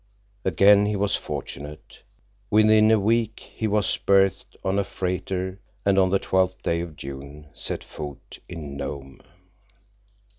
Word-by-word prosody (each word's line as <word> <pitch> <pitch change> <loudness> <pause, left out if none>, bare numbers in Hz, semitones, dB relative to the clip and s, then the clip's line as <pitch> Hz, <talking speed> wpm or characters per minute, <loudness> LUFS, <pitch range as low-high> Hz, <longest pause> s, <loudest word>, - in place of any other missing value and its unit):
Again 100 +3 +5
he 105 - 0
was 100 0 +1
fortunate. 75 +2 -7 0.5
Within 110 0 +5
a 110 -1 +5
week 110 +1 0
he 110 - -1
was 105 -1 +1
berthed 95 -2 +2
on 95 +1 +1
a - - +2
freighter, 95 0 -3 0.3
and 100 -1 +4
on 95 -1 +4
the 100 - +3
twelfth 95 -1 0
day 85 0 0
of 85 -3 -7
June 70 +2 -9
set - - -4
foot 75 -2 -9
in 75 -5 -7
Nome. 70 -1 -6
95 Hz, 140 wpm, -24 LUFS, 75-100 Hz, 0.5 s, Again